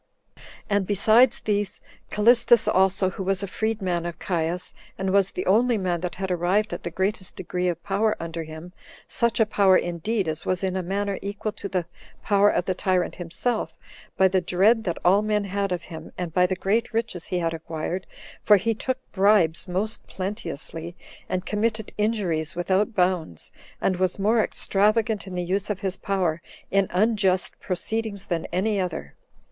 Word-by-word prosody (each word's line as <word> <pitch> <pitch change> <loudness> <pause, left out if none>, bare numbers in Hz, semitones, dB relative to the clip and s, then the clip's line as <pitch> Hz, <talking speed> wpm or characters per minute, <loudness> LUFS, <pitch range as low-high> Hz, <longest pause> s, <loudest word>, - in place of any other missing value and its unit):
And 200 -3 +1
besides 220 +5 +4
these, 205 -2 -1 0.3
Callistus 235 +1 +5
also, 190 0 +3
who 190 - -7
was 195 +1 0
a - - -2
freed 220 +2 -2
man 175 -2 -1
of 170 -2 -6
Caius, 175 0 -2 0.2
and 190 0 -1
was 195 -1 +3
the 180 - -4
only 230 +4 +3
man 180 -4 -1
that 180 -1 -3
had 190 0 -3
arrived 180 +4 +1
at 175 - -4
the - - -4
greatest 190 +2 -2
degree 180 0 -2
of 175 -1 -2
power 210 +2 +1
under 165 0 -4
him, 160 +3 -9 0.3
such 235 0 +1
a 225 - +5
power, 195 -3 +4
indeed, 180 +4 -1
as 155 0 -2
was 185 0 -1
in 190 -1 0
a 190 - 0
manner 195 +2 -2
equal 205 +2 -3
to 205 -1 -7
the 180 -3 -1 0.4
power 205 0 +4
of 180 - 0
the 185 - 0
tyrant 185 -1 0
himself, 185 +7 -2 0.4
by 190 - +6
the 185 0 +1
dread 205 +6 +3
that 170 - -1
all 190 +3 +5
men 210 -1 0
had 200 0 -2
of 175 -1 -2
him, 160 -1 -9
and 175 -3 -4
by 180 +1 +4
the 185 - -1
great 210 +6 0
riches 225 -7 -2
he 180 - -2
had 165 -1 0
acquired; 165 +3 -4 0.3
for 210 - +6
he 225 +4 0
took 255 +4 -2
bribes 195 -5 +3
most 195 +5 -2
plenteously, 170 -3 -5 0.3
and 185 0 -2
committed 220 0 -1
injuries 180 -8 0
without 190 +5 +1
bounds, 180 - 0 0.3
and 185 - +1
was 185 -1 0
more 215 +3 +3
extravagant 215 +1 +1
in 185 - -6
the 180 - -1
use 195 +3 -1
of 210 -1 -2
his 190 -2 -1
power 180 -5 -1 0.3
in 195 -1 +3
unjust 195 -1 +1
proceedings 200 +2 -3
than 170 -3 -2
any 205 +3 0
other. 170 - -3
190 Hz, 180 wpm, -25 LUFS, 180-210 Hz, 0.4 s, by